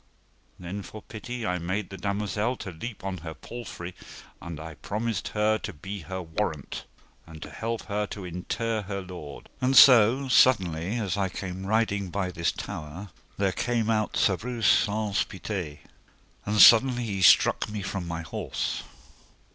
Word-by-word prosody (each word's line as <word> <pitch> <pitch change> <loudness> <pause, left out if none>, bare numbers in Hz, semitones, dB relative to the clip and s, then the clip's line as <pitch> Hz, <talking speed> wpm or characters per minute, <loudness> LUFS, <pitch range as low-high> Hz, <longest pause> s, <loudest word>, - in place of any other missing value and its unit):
Then 90 +3 -6
for 105 +2 -10
pity 115 +2 -6
I 90 0 -1
made 95 +3 -3
the - - -6
damosel 105 +5 -1
to 95 - -6
leap 100 +7 -7
on 95 -2 -4
her 80 -1 -7
palfrey, 105 -7 -8 0.5
and 85 -3 -7
I 80 +1 -7
promised 110 +8 -3
her 110 +1 +1
to 110 - -6
be 95 +6 -7
her 95 +2 -6
warrant, 80 -3 -4 0.4
and 80 -1 -11
to - - -9
help 115 +1 -3
her 105 0 -2
to 100 -2 -7
inter 110 +6 -2
her 100 0 -4
lord. 90 -6 -9
And 130 +1 +3
so, 125 +1 +8
suddenly, 95 -8 +3
as 100 -4 -1
I 95 -1 0
came 95 0 -6
riding 100 -3 +1
by 95 0 -2
this 85 -2 0
tower, 80 +7 -7 0.3
there 100 -1 +2
came 115 +1 0
out 110 -1 0
Sir 95 - +3
Breuse 115 +3 -4
Saunce 105 0 +3
Pité, 90 -6 -5 0.7
and 105 +1 +1
suddenly 120 +2 +8
he 100 -4 -3
struck - - +5
me 105 -2 -4
from 95 -2 -4
my 85 0 -4
horse. 80 - -3
100 Hz, 165 wpm, -27 LUFS, 90-110 Hz, 0.7 s, so